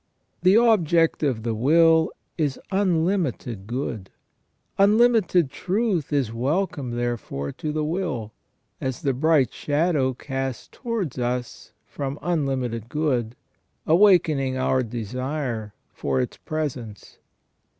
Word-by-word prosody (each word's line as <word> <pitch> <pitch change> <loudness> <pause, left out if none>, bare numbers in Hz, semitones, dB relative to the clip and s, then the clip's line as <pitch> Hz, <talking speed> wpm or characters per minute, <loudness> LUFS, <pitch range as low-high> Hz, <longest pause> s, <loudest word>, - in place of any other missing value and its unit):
The 185 +3 +5
object 170 -8 +3
of 130 -7 0
the 115 -1 -1
will 160 +7 +4 0.2
is 145 -5 -1
unlimited 165 - 0
good; 115 -5 -4 0.7
unlimited 205 - +4
truth 190 - -1
is 135 -6 0
welcome 135 0 -1
there 120 0 -1
fore 70 -8 -5
to 155 - -4
the 155 0 -1
will, 150 - -2 0.5
as 130 -3 -3
the 135 - +1
bright 145 -2 +2
shadow 145 -3 0
cast 135 -2 -5
towards 210 - -3
us 125 0 -3
from 140 0 -5
unlimited 130 -9 -1
good, 130 -7 -1 0.5
awakening 160 -7 +4
our 130 0 +2
desire 120 0 -4 0.2
for 70 -2 -1
its 65 - -3
presence. 130 -9 -5
140 Hz, 110 wpm, -24 LUFS, 120-165 Hz, 0.7 s, The